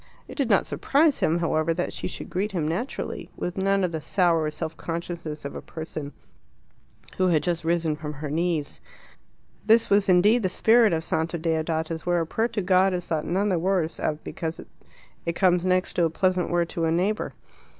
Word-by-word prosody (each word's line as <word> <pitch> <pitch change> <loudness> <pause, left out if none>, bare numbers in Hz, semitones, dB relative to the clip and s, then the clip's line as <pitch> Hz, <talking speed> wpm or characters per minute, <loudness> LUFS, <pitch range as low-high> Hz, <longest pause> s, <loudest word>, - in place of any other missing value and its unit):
It - - -9
did 275 -6 -1
not 200 - +4
surprise 295 +1 +2
him, 160 +2 +2
however, 165 -1 0
that 180 - -2
she - - -4
should - - -8
greet 195 +3 -1
him 160 -5 -1
naturally, 185 - -4
with 180 - -3
none 195 0 +1
of 180 - 0
the 160 -1 -4
sour 165 -3 +2
self 155 +1 -5
consciousness 165 -3 -5
of 140 - -5
a - - -6
person 155 -3 -7 1.1
who 185 - +3
had 160 -4 +2
just 170 -2 -1
risen 165 -2 +1
from 150 0 -6
her 145 0 -6
knees. 165 -2 -1 0.8
This 225 +1 +4
was 200 -1 +4
indeed 205 +7 +5
the 190 - 0
spirit 225 +3 +4
of 160 -1 0
Santa 160 +1 -1
Deodata's, 160 0 -1
where 175 0 +1
a 165 - 0
prayer 225 +8 0
to 210 -4 -3
God 185 0 +3
is 175 -1 -4
thought 160 -2 -2
none 195 +5 +1
the 180 -3 +1
worse 175 -2 0
of 155 0 -2
because 160 0 -5 0.7
it 170 - +1
comes 180 -2 +3
next 185 0 +1
to 170 - +2
a - - +1
pleasant 185 +2 +1
word 175 -1 +1
to 165 - -1
a 160 - +1
neighbour. 190 +6 0
175 Hz, 200 wpm, -25 LUFS, 160-190 Hz, 1.1 s, indeed